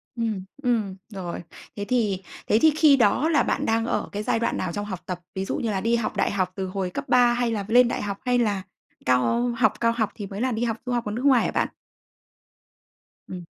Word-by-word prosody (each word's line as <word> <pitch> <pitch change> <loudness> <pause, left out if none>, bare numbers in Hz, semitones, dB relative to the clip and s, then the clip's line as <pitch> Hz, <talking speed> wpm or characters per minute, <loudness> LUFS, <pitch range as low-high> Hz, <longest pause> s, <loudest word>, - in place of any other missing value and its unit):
Ừm, 225 -5 -2 0.2
ừm, 220 -6 0
rồi. 185 -5 -6 0.3
Thế 205 - -4
thì 210 -6 0 0.2
thế 215 - +4
thì 315 - +6
khi 310 -3 +6
đó 250 +6 +3
là 310 -3 +3
bạn - - -1
đang 225 0 +1
ở - - -1
cái 205 +1 -4
giai 225 - +1
đoạn 235 - 0
nào 180 - -2
trong 205 +3 -3
học 190 -3 -5
tập? 180 -1 -4 0.2
Ví 190 0 -2
dụ - - -2
như 225 -3 -1
là 190 - -1
đi 230 +3 +2
học 235 - -2
đại - - +1
học 185 -2 0
từ 190 -1 -3
hồi 185 -1 -3
cấp 275 +10 -5
3 245 -1 +5
hay 240 -1 0
là 205 -3 -2
lên 245 +2 +6
đại 235 - -2
học 200 -1 -3
hay 250 -1 +2
là 205 -5 +1 0.4
cao 130 - +2
học 230 - +3
cao 230 0 +3
học 225 -3 0
thì 205 -3 -6
mới 195 +2 -6
là 255 +1 +1
đi 225 0 -1
học 230 -2 -1
du 250 - -3
học 240 -1 -1
ở 210 - -3
nước 240 +6 -3
ngoài 260 -4 +5
hả - - -1
bạn? - - +1 1.6
Ừm. 180 -2 -7
220 Hz, 245 wpm, -25 LUFS, 195-240 Hz, 1.6 s, thì